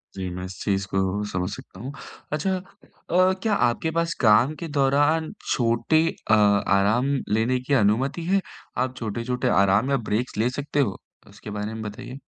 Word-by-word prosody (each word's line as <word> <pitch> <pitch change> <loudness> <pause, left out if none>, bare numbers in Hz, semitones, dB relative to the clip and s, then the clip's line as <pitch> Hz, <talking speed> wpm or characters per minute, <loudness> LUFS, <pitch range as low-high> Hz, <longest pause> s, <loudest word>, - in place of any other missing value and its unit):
जी 95 -1 -4
मैं 90 - -5
इस 95 - -8
चीज़ 100 -1 0
को 95 - -1 0.3
समझ 90 +1 -2
सकता 95 - -13
हूँ। 130 +5 -6 0.4
अच्छा 185 +5 0
अ, 185 0 -1
क्या 220 -2 +1 0.2
आपके 160 +7 -2
पास 170 0 +1
काम 120 +6 +5
के 170 - -5
दौरान 145 +4 +2 0.2
छोटे 125 +7 +2 0.3
अ, - - +7
आराम 105 +5 +3 0.2
लेने 125 +3 +1
की 145 - +1
अनुमति 135 +10 +1
है, 195 - +4 0.4
आप 130 0 -1
छोटे-छोटे 120 +3 -2 0.2
आराम 100 +7 +2
या 135 - +3
ब्रेक्स 110 +1 -1
ले 115 +3 +2
सकते 145 +2 -3
हो? 100 -10 +1 0.3
उसके 100 +1 -11
बारे 105 +1 -4
में 110 - -6
बताइए। 125 +5 -7
125 Hz, 170 wpm, -24 LUFS, 105-145 Hz, 0.4 s, अ